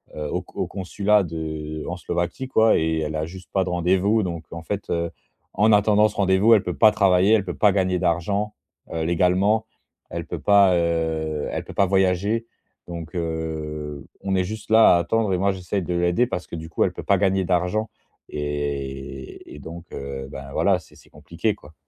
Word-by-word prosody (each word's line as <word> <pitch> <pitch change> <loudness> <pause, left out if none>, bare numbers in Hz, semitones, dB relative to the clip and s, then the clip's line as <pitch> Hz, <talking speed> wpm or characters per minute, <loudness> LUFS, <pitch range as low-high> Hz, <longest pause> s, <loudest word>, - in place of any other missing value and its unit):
heu, 75 -1 -4
au - - -2
co - - -13
au - - 0
consulat 100 +2 +1
de 80 -2 -5
en 85 - -3
Slovaquie, 90 +8 -3
quoi, 110 -3 +4
et 80 0 0
elle 80 0 -3
a 75 0 -1
juste 95 +2 -11
pas 95 -1 +2
de 90 - -4
rendez-vous 95 +5 +2
donc 85 -2 -4
en 85 0 -7
fait, 100 +3 -4
heu, 85 0 -1 0.4
en 110 +1 +3
attendant 105 +1 +4
ce - - -13
rendez-vous, 100 +3 +4
elle 105 - +4
peut 90 - -3
pas 110 -1 +7
travailler. 95 +1 +4
Elle 100 -3 +3
peut 90 - -4
pas 105 -2 +5
gagner 95 -1 +1
d'argent, 95 +5 0 0.4
heu, 80 -1 -2
légalement. 90 +6 +2 0.4
Elle - - -5
peut - - -5
pas, 100 -3 +5
heu, 80 -2 -1
elle - - -3
peut - - -10
pas 100 - +3
voyager. 95 +4 +1 0.4
Donc, 85 +1 -7
heu, 80 -3 -4 0.2
on 95 -1 -1
est 90 -1 +1
juste 110 +2 -7
là 110 -5 +7
à - - +4
attendre 105 +3 0
et - - +2
moi 100 +2 +2
j'essaye 95 +1 -3
de 90 +1 -3
l'aider 85 +7 +2
parce 90 -7 -4
que, - - -7
du 80 0 -7
coup, 80 - +1
elle - - -2
peut - - -7
pas - - +3
gagner 95 -1 +2
d'argent 90 +5 0 0.4
et 70 -3 -5
et - - -10
donc, 85 +4 -9
heu, 70 -1 -6
ben, 70 0 -8
voilà, - - +2
c'est - - -19
c'est - - -20
compliqué, 85 +8 -3
quoi. 75 - -17
90 Hz, 205 wpm, -23 LUFS, 80-100 Hz, 0.4 s, pas